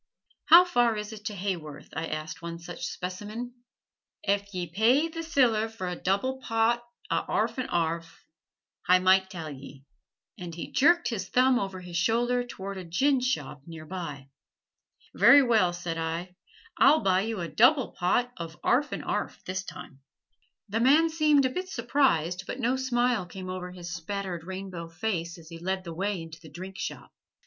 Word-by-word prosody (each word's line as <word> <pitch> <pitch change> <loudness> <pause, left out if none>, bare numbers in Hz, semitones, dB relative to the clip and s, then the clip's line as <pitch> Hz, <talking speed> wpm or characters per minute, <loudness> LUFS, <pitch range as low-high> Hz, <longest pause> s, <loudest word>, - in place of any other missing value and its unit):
"How 345 +1 +9
far 240 -10 +2
is 210 +1 -5
it 210 -1 -11
to 210 - -3
Haworth?" 180 -6 -5
I 160 +2 -2
asked 155 +2 -5
one 170 0 -5
such 170 0 -6
specimen. 210 +7 -6 0.7
"Ef 200 0 0
ye 180 -2 -3
pay 225 - +3
th' 330 0 -5
siller 240 -9 +2
for 220 -5 -6
a 180 - -3
double 200 +10 -1
pot 230 +1 +1 0.3
a' - - +2
'arf - - 0
and 255 - -3
'arf. 165 0 -2 0.6
Hi 180 0 +7
might 190 +1 +4
tell 165 -5 -6
ye"; 140 0 -11 0.6
and 175 -2 -7
he 170 - -7
jerked 340 +6 +4
his 195 -6 -4
thumb 255 0 +4
over 190 -3 -4
his 175 -1 -5
shoulder 240 +6 +2
toward 200 -5 -7
a - - -6
ginshop 245 - 0
near 160 -2 -9
by. 150 -6 -6 0.8
"Very 285 -1 +7
well," 220 -8 +3
said 175 -1 -4
I; 165 +3 -4 0.4
"I'll 280 +7 +6
buy 185 -1 +3
you 220 0 -3
a 170 - -3
double 255 - +4
pot 245 +8 +1
of 165 -2 -7
'arf 285 +4 +2
and - - -4
'arf, - - -3
this 185 +1 -3
time." 140 -7 -10 0.7
The 215 +2 -1
man 300 +7 +5
seemed 300 -3 +4
a - - +2
bit 365 +6 -4
surprised, 225 - +1
but 250 - -5
no 250 +1 +1
smile 245 -6 +1
came 185 0 -7
over 180 -1 -5
his 175 -1 -7
spattered 180 -1 -4
rainbow 185 -3 -6
face 170 -2 -3
as 165 -1 -14
he 165 -1 -9
led 190 +2 -2
the 170 -2 -7
way 195 +2 -2
into 165 0 -9
the 160 - -12
drink 185 +5 -9
shop. - - -6
190 Hz, 175 wpm, -28 LUFS, 170-245 Hz, 0.8 s, How